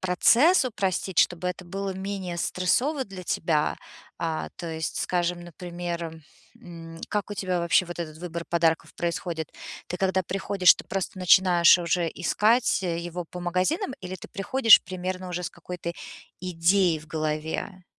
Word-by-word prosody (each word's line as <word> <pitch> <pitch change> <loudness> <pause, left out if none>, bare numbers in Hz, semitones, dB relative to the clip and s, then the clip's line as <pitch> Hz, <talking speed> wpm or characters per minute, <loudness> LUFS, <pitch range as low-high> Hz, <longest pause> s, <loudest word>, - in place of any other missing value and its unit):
процесс 240 - +4
упростить, 195 -5 -2
чтобы 180 +1 +2
это 180 0 -5
было 195 +2 -4
менее 190 -2 -4
стрессово 255 - 0
для 190 -2 -10
тебя. 155 -3 0 0.4
А, 160 -1 -3
то 175 - -6
есть, 160 0 -4
скажем, 175 -1 -1
например, 175 -1 -6 0.4
м, 165 -1 -10
как 210 -1 -2
у - - -3
тебя 185 -2 -1
вообще 170 +1 +3
вот 175 0 -8
этот 155 -2 -6
выбор 170 -1 -5
подарков 165 -1 +1
происходит? 170 -2 -3 0.4
Ты 180 - -3
когда 190 0 +1
приходишь, 195 0 +4
ты - - -10
просто 190 0 -4
начинаешь 180 -1 +6
уже 170 0 0
искать, 220 +6 +2
э, 170 -2 -1
его 175 0 -5
по 180 - -7
магазинам 185 - 0
или 185 0 -6
ты - - -12
приходишь 225 +3 +5
примерно 185 0 -5
уже 180 0 -3
с - - -3
какой-то 170 0 -6 0.5
идеей 175 -1 +2
в 155 - -15
голове? 160 +4 -3
180 Hz, 155 wpm, -26 LUFS, 170-190 Hz, 0.5 s, начинаешь